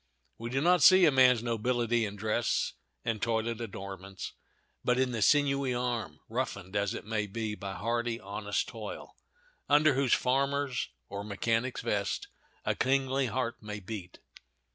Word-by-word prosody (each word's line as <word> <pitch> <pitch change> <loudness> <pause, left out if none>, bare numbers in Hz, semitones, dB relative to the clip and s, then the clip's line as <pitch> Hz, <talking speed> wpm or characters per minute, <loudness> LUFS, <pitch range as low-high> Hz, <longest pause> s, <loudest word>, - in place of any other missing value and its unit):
We 115 +1 -4
do 135 +2 0
not 180 +2 +4
see 185 -2 +8
a 155 - +6
man's 125 -3 +5
nobility 120 0 +1
in 105 0 -5
dress 110 +2 0 0.3
and 110 -3 -1
toilet 115 0 0
adornments, 95 -3 -7 0.5
but 125 0 +2
in 130 -1 +2
the 115 -2 -2
sinewy 140 0 +3
arm, 120 -11 -2
roughened, 95 +3 -3
it 100 -1 -1
may 105 -1 -1
be, 110 +1 -3
by 100 -2 -5
hardy, 120 +1 -1
honest 105 0 -2
toil 110 -4 -8 0.5
under 150 +1 +5
whose 135 -2 +2
farmer's 140 0 0 0.2
or 100 0 -5
mechanic's 115 +5 -1
vest 100 -1 -1 0.4
a - - +2
kingly 135 0 +1
heart 120 0 -2
may 105 -1 -6
beat. 95 -2 -7
115 Hz, 145 wpm, -30 LUFS, 105-130 Hz, 0.5 s, see